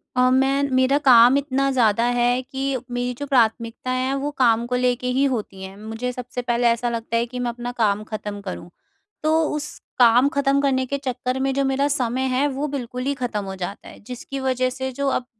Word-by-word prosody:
अ, 250 0 +4
मैं 270 +2 +2
मेरा 260 +2 +3
काम 255 -2 +6
इतना 275 -1 0
ज़्यादा 230 -3 +2
है 245 +1 +2
कि 270 +1 -3
मेरी 245 0 -2
जो 285 +4 -6
प्राथमिकताएँ 250 +1 0
हैं, 265 - -1
वो 280 +2 -2
काम 235 -2 +3
को 250 - -1
लेके 250 0 0
ही 275 - +3
होती 195 -4 -5
हैं। 190 0 -8
मुझे 225 +4 -4
सबसे 250 0 -6
पहले 240 0 +1
ऐसा 235 +1 +1
लगता 230 0 -2
है 230 - +1
कि 250 +1 -7
मैं 245 -1 -1
अपना 240 +1 -5
काम 215 -3 0
ख़त्म 210 -1 -6
करूँ। 185 -2 -7 0.5
तो 310 - +2 0.2
उस 300 0 -3 0.3
काम 245 +3 +6
ख़त्म 280 0 +2
करने 260 -2 +1
के 280 +2 -2
चक्कर 255 -1 -3
में 270 0 0
जो 275 +1 0
मेरा 270 +1 +1
समय 255 -3 -1
है, 260 +3 +1
वो 285 +2 -3
बिल्कुल 250 -3 -5
ही 280 - +1
ख़त्म 240 -6 -3
हो 190 0 -6
जाता 190 +2 -6
है, - - -14
जिसकी 255 +2 -6
वजह 255 -1 0
से 260 +1 -4
जो 280 +2 -3
अब 255 - -1
250 Hz, 215 wpm, -22 LUFS, 235-270 Hz, 0.5 s, काम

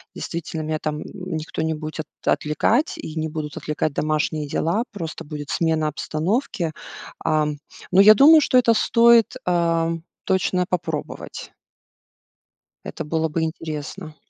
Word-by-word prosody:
действительно 165 -1 -5
меня 155 0 -2
там, 150 -1 -3
м, - - -5 0.3
никто 155 0 -5
не 160 0 0
будет 155 0 -5 0.2
отвлекать, 150 - +1
и 155 - -7
не 160 0 -1
будут 150 -1 -5
отвлекать 150 0 -2
домашние 155 0 -1
дела, 185 +10 0
просто 165 -6 -6
будет 145 -1 -7
смена 160 -2 +1
обстановки. 170 - -2 0.5
Ам, 150 -2 +1 0.3
но 185 +2 +7
я 210 +2 +9
думаю, 305 +8 +7
что 255 - +3
это 235 -2 +5
стоит, 235 +1 +4
ам, 165 -1 +1 0.2
точно 185 -1 +1
попробовать. 165 -4 -4 1.3
Это - - -5
было 160 +1 0
бы 160 +1 -2
интересно. 155 +1 -5
160 Hz, 135 wpm, -22 LUFS, 155-185 Hz, 1.3 s, я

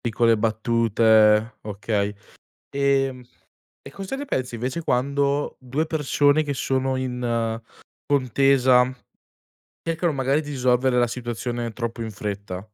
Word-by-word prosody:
piccole 115 -1 +2
battute, 110 0 +3
okay. 105 0 -2 0.6
Ehm, 135 -2 +1 0.6
e 135 - -11
cosa 195 - -6
ne 285 - -5
pensi 125 - -2
invece 130 +8 -3
quando 140 +2 0
2 135 +5 -2
persone 150 -1 +2
che 145 -1 -3
sono 130 0 0
in 120 -3 -2 0.5
contesa, 130 -2 +3 0.9
cercano 165 0 -1
magari 135 +2 +1
di 145 - -8
risolvere 125 -1 +2
la 120 - +4
situazione 120 0 -4
troppo 115 0 -4
in 110 - -4
fretta? 100 -2 -5
125 Hz, 120 wpm, -23 LUFS, 115-140 Hz, 0.9 s, la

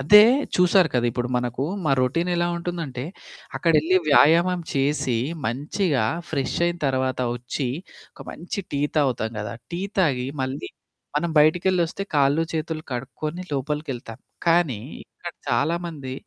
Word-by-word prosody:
అదే 210 +10 +9 0.3
చూసారు 180 -1 +5
కదా! 120 -1 +2
ఇప్పుడు 120 +1 -2
మనకు 125 +2 -1 0.2
మా 140 - +3
రొటీన్ 165 +8 +1
ఎలా 175 0 +1
ఉంటుందంటే 165 -7 -4 0.5
అక్కడెళ్లి 165 +2 +3
వ్యాయామం 170 +5 +5
చేసి 135 -3 +1 0.3
మంచిగా 140 - 0 0.3
ఫ్రెష్ 140 -4 -1
అయిన 175 0 -1
తర్వాత 130 -1 0 0.2
వచ్చి 125 +2 -3 0.4
ఒక - - -18
మంచి 180 +4 -5
టీ 140 - 0 0.2
తాగుతాం 125 -6 +1
గదా! 105 - -5 0.2
టీ 175 +1 -3 0.2
తాగి 135 -9 +2 0.2
మళ్ళీ 130 +2 -4 0.5
మనం 170 +3 0
బయటికెళ్ళొస్తే 175 +4 +3
కాళ్ళు 145 +3 +3
చేతులు 160 0 -3
కడుక్కొని 145 +7 -4
లోపలికెళ్తాం 135 -5 -4 0.3
కానీ 165 -9 +3 0.2
ఇక్కడ 175 -1 -10 0.2
చాలామంది 160 -4 -1
150 Hz, 125 wpm, -24 LUFS, 130-170 Hz, 0.5 s, అదే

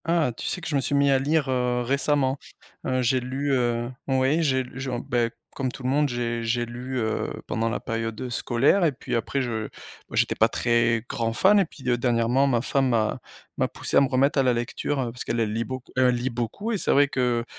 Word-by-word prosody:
Ah, 165 -5 +2
tu - - -5
sais 180 - -2
que - - -6
je 155 - -1
me 140 - +2
suis 140 - 0
mis 140 0 +4
à 135 - +4
lire, 145 +1 +1
heu, 125 -1 0
récemment, 140 +1 +1 0.5
heu, 130 -1 +1
j'ai 130 +2 +2
lu, 135 +3 -2
heu 120 -1 0 0.2
oui, 135 +4 +2
j'ai 130 -4 +2
genre 130 -1 -3
ben, 120 -1 0 0.3
comme 130 -2 -2
tout 130 - -10
le 130 - 0
monde, 145 +2 +2
j'ai 120 -1 -2
j'ai 120 +1 0
lu, 125 +2 -6
heu, 110 -1 -1
pendant 115 +1 -1
la 115 - -2
période 115 +2 -4
scolaire 130 +11 +2
et 160 -4 +3
puis - - -7
après 130 +4 -1
je 110 -3 -3 0.4
ben - - -7
j'étais - - +2
pas - - +3
très 115 -1 +1
grand 115 -1 -2
fan 200 - +5
et 195 - +3
puis, 135 -5 -12
heu, 120 -1 +2
dernièrement, 120 +2 +2
ma 120 -4 +2
femme 135 -1 +1
m'a 110 -3 +1 0.4
m'a - - +2
poussé - - -4
à - - +7
me 140 - +3
remettre 135 +2 +2
à - - +4
la 125 -1 +3
lecture 120 +4 -2 0.2
parce 125 - -7
qu'elle, 120 - -2
elle 110 -2 0
lit 115 +1 -1
beaucoup 130 -1 -7
elle 125 -1 +4
lit 125 +2 -2
beaucoup 120 - -3
et 215 - -1
c'est - - +1
vrai 140 0 +5
que 125 -3 0
125 Hz, 235 wpm, -25 LUFS, 120-140 Hz, 0.5 s, à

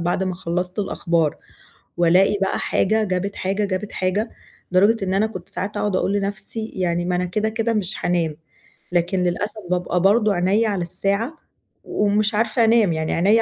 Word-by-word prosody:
بعد 175 +2 0
ما 185 -1 -1
خلّصت 180 +2 -3
الأخبار، 170 -5 0 0.6
والاقي 180 +4 +4
بقى 195 - 0
حاجة 220 +3 +1
جابت 195 +1 -2
حاجة، 195 +2 -1
جابت 200 +1 -3
حاجة، 195 +5 -1 0.4
لدرجة 200 +3 +4
إن 185 - -1
أنا 210 +3 +2
كنت 185 -5 -9
ساعات 200 +2 -4
اقعُد 205 -3 0
أقول 195 - +1
لنفْسِي 205 +2 -3
يعني 175 -2 -1
ما 180 - 0
أنا 180 0 0
كده، 215 +5 -1
كده 225 +1 -1
مش 205 -2 -1
حانام، 165 -4 -1 0.5
لكن 175 +2 +1
للأسف 205 +5 -2
بابقى 180 0 0
برضه 210 +2 +4
عينيَّا 195 +5 +2
على 195 -3 -1
الساعة، 200 - -2 0.5
ومش 210 +1 +1
عارفة 225 +1 +2
أنام، 220 -5 +4
يعني 160 0 -1
عينيَّا 205 +7 +4
195 Hz, 170 wpm, -22 LUFS, 180-215 Hz, 0.6 s, والاقي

